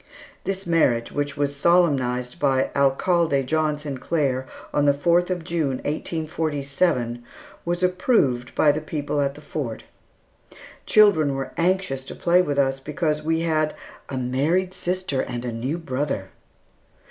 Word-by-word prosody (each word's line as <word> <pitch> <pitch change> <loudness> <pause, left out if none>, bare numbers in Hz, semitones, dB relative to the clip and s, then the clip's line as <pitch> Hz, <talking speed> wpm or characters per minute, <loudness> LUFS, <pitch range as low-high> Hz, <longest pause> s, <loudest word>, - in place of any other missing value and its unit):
This 195 0 -3
marriage, 135 -9 +2
which 145 0 -3
was 145 0 0
solemnized 140 -7 +2
by 135 -2 +2
Alcalde 140 +1 +2
John 155 +2 0
Sinclair 140 -2 -2 0.3
on 145 - +2
the 140 -1 +4
fourth 175 +4 +2
of 180 -2 -2
June, 160 -6 -1
1847, 145 -5 -1 0.4
was 175 +1 -1
approved 180 - +1
by 150 - +5
the 155 +2 -3
people 150 -1 -2
at 140 0 -1
the 150 - -12
Fort. 140 -6 -5 1.0
Children 165 -10 +5
were 135 -1 -4
anxious 175 -6 0
to - - -8
play 175 +1 +3
with 145 -5 -2
us 135 -1 +2
because 150 +2 -1
we 160 +1 0
had 155 -2 0 0.3
"a 135 - -4
married 150 +9 0
sister 180 -8 -2
and 120 0 -5
a 120 - -2
new 125 +8 -3
brother." 135 - -3
145 Hz, 140 wpm, -23 LUFS, 135-170 Hz, 1.0 s, by